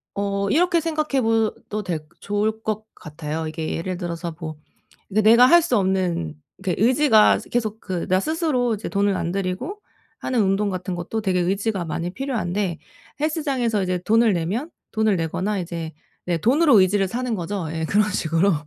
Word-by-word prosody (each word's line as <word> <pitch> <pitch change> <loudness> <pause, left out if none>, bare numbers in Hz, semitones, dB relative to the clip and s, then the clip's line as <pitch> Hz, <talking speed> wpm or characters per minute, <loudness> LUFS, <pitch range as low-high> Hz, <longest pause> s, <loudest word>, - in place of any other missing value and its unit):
어 200 0 -1
이렇게 345 - +3
생각해 310 -4 0
봐도 225 -2 0
될 165 -5 -3
좋을 215 +2 -1
것 215 0 -2
같아요. 155 +1 -5
이게 155 0 -3
예를 180 +2 -3
들어서 170 -2 -4
뭐 160 -2 -5 0.6
내 215 - +4
내가 230 +3 +7
할 345 +6 +7
수 315 -7 0
없는 185 - 0 0.2
이렇게 190 0 -2
의지가 245 -2 +5
스 - - -13
계속 220 -2 -1
그 185 -4 -4
나 185 +1 +3
스스로 305 - 0
이제 210 - -6
돈을 200 -1 +1
안 170 - -2
들이고 195 - -3 0.4
하는 250 -3 0
운동 200 +1 +1
같은 185 -1 -4
것도 175 +6 -3
되게 190 -3 +1
의지가 195 +2 0
많이 170 +2 -3
필요한데 205 - -2 0.4
헬스장에서 275 - 0
이제 185 0 0
돈을 225 +1 +4
내면 190 - -2 0.2
돈을 220 -2 +2
내거나 185 +5 -1
이제 170 -2 -5 0.3
네 175 -1 0
돈으로 260 - +5
의지를 195 +1 +3
사는 245 +1 -2
거죠. 185 -1 -3
예 160 0 -3
그런 210 +5 +2
식으로 170 +1 +2
200 Hz, 345 characters per minute, -23 LUFS, 180-230 Hz, 0.6 s, 내가